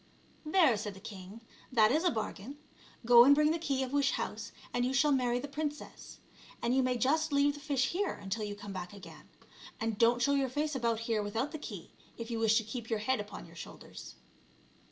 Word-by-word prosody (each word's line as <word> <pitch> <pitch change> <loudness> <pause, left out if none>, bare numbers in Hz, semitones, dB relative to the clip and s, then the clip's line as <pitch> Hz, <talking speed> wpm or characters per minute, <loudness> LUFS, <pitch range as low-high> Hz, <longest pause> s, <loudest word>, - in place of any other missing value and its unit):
*' - - -32
" - - -32
There," 310 - +5
said 205 -1 -5
the - - -11
king, 200 +1 -10 0.2
" - - -25
that 215 0 +6
is 310 +5 +2
a 360 - +4
bargain; 220 +3 -5 0.5
go 235 0 +9
and 280 +3 +7
bring 300 +1 +3
the 330 - -1
key 275 -5 -1
of 260 +1 -5
wish 280 -2 +2
house - - -4 0.2
and 245 - +1
you 255 +2 0
shall 290 +2 +3
marry 250 -3 +2
the 285 - -5
princess; 295 +1 -6 0.4
and 240 +2 0
you 265 - +4
may 255 -1 0
just 310 +5 +1
leave 285 0 +3
the 290 - -10
fish 280 -3 0
here 390 +3 -1
until 205 +2 -4
you 205 -1 -4
come 205 -1 -8
back 180 0 -6
again. 200 -2 -13 0.5
And 225 -2 -2
don't 235 +1 +4
show 280 +3 +2
your 275 -2 +1
face 295 +4 -2
about 230 -3 0
here 230 -2 0
without 225 +7 -2
the 310 - -6
key, - - -8 0.3
if 230 0 -6
you 230 - -2
wish 220 -1 +4
to 225 - +1
keep 225 +1 -7
your 225 - +1
head 225 +4 0
upon 205 -3 -7
your 170 0 -16
shoulders." 165 - -10
245 Hz, 235 wpm, -32 LUFS, 220-285 Hz, 0.5 s, go